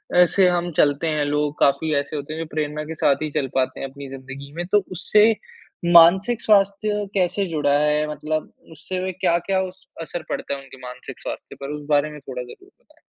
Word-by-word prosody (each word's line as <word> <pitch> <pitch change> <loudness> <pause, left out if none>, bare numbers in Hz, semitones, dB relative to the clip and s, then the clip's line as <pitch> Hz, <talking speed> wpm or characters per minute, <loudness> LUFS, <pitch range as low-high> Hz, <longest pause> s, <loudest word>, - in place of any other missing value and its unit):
अ, 180 0 +8
से 185 +2 +3
हम 175 0 0
चलते 145 +2 +3
हैं 150 -2 +1
लोग 150 0 -1
काफ़ी 140 +3 +2
ऐसे 140 +2 -2
होते 145 +1 -5
हैं 160 - -5
जो - - -3
प्रेरणा 150 0 -2
के 160 +1 -6
साथ 140 -2 +2
ही 155 - -2
चल 145 -2 -1
पाते 130 -1 0
हैं 135 - -3
अपनी 140 0 -10
ज़िंदगी 135 +1 -9
में, 175 +2 -4
तो 205 +1 +3
उससे 210 +5 +4 0.6
मानसिक 190 +8 +6
स्वास्थ्य 205 0 +2
कैसे 190 +1 +1
जुड़ा 145 -3 +2
है? 150 0 +2
मतलब 155 +1 -3 0.2
उससे 165 +4 -5
वे 185 - -2
क्या-क्या 185 +1 +1
उस 190 0 -8
असर 165 +1 -5
पड़ता - - -3
है - - -7
उनके 135 0 -14
मानसिक 125 0 -9
स्वास्थ्य - - -7
पर? 140 - -5
उस 150 0 -6
बारे 145 0 +3
में 150 - -9
थोड़ा 130 -2 -6
ज़रूर 380 - -14
बताएँ। - - -28
155 Hz, 210 wpm, -22 LUFS, 145-185 Hz, 0.6 s, अ